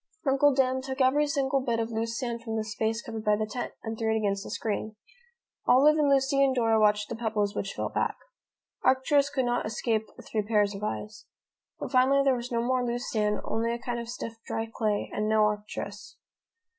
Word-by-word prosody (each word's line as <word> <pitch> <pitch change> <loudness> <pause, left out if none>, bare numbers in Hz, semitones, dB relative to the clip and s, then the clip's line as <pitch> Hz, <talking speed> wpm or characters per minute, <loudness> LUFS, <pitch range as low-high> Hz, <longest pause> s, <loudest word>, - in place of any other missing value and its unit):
Uncle 275 +1 +4
Dan 260 -1 +1
took 265 0 -5
every 280 +3 +3
single 275 -1 +1
bit 235 -3 -1
of 225 0 -2
loose 230 +1 -2
sand 235 -3 -3
from 225 -1 -4
the 220 - 0
space 220 +1 -2
covered 225 -1 -6
by 210 -1 +3
the 215 +1 -1
tent, 240 +3 -5
and 225 -1 -5
threw 220 -1 +1
it 220 - +2
against 200 -2 -1
the - - -8
screen. 215 0 -3 0.7
Olive 300 +4 +6
and 290 -2 +3
Lucy 275 0 +3
and 265 -1 +2
Dora 225 -2 +3
watched 210 0 +3
the - - -5
pebbles 215 -3 -1
which 195 - -3
fell - - -3
back. - - -1 0.7
Arcturus 275 +2 +3
could 270 -3 0
not 245 0 0
escape 220 -1 -1 0.2
three 215 - 0
pairs 210 -1 +1
of 195 +1 -7
eyes. 215 0 -5 0.5
But - - -5
finally 270 +1 +4
there 270 -1 +4
was 245 +1 -4
no 235 -1 0
more 255 +1 +1
loose 245 +1 -3
sand, 210 -1 0
only 230 +1 -1
a 235 - -2
kind 240 -1 -4
of 235 0 -6
stiff 230 -1 -5
dry 225 - -2
clay, 210 -2 -1
and 215 +1 -1
no 215 0 +4
Arcturus. 210 0 -3
230 Hz, 210 wpm, -28 LUFS, 215-260 Hz, 0.7 s, Olive